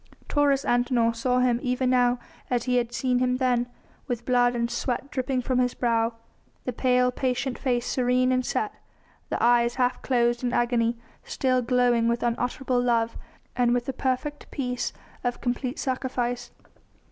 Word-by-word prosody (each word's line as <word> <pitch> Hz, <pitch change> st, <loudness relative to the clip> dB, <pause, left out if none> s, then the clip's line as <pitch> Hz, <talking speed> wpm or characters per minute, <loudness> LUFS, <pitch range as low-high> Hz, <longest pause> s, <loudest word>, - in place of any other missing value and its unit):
Taurus 285 Hz, -2 st, +2 dB
Antinor 240 Hz, -1 st, +2 dB
saw 250 Hz, +2 st, +1 dB
Him 245 Hz, -2 st, +2 dB
even 250 Hz, -1 st, 0 dB
now 245 Hz, -1 st, +3 dB, 0.3 s
as 245 Hz, -2 st, 0 dB
he 250 Hz, 0 st, +1 dB
had 240 Hz, -1 st, 0 dB
seen 250 Hz, 0 st, 0 dB
Him 250 Hz, 0 st, +1 dB
then, 250 Hz, -2 st, +1 dB, 0.4 s
with 240 Hz, -1 st, -3 dB
blood 245 Hz, -1 st, +3 dB
and 235 Hz, 0 st, -1 dB
sweat 265 Hz, +2 st, -2 dB
dripping 255 Hz, -1 st, -1 dB
from 255 Hz, 0 st, 0 dB
His 250 Hz, -1 st, +1 dB
brow, 230 Hz, -1 st, +1 dB, 0.5 s
the 250 Hz, -, -2 dB
pale, 250 Hz, 0 st, +2 dB
patient 255 Hz, 0 st, -2 dB
face 245 Hz, -3 st, 0 dB
serene 255 Hz, 0 st, +2 dB
and 255 Hz, 0 st, +2 dB
set, 215 Hz, -, -1 dB, 0.6 s
the -, -, -1 dB
eyes 235 Hz, 0 st, +4 dB
half 250 Hz, -1 st, 0 dB
closed 240 Hz, -1 st, +1 dB
in 245 Hz, 0 st, 0 dB
agony 240 Hz, -1 st, +1 dB, 0.3 s
still 255 Hz, -1 st, 0 dB
glowing 245 Hz, -1 st, +2 dB
with 235 Hz, 0 st, 0 dB
unutterable 245 Hz, +1 st, 0 dB
love 230 Hz, -2 st, +1 dB, 0.4 s
and 245 Hz, -1 st, +3 dB
with 245 Hz, -1 st, -1 dB
the 270 Hz, -, -3 dB
perfect 265 Hz, +3 st, -2 dB
peace 250 Hz, -3 st, -2 dB, 0.3 s
of 245 Hz, -1 st, -1 dB
complete 250 Hz, +2 st, -2 dB
sacrifice. 250 Hz, -2 st, -2 dB
245 Hz, 160 wpm, -26 LUFS, 240-255 Hz, 0.6 s, eyes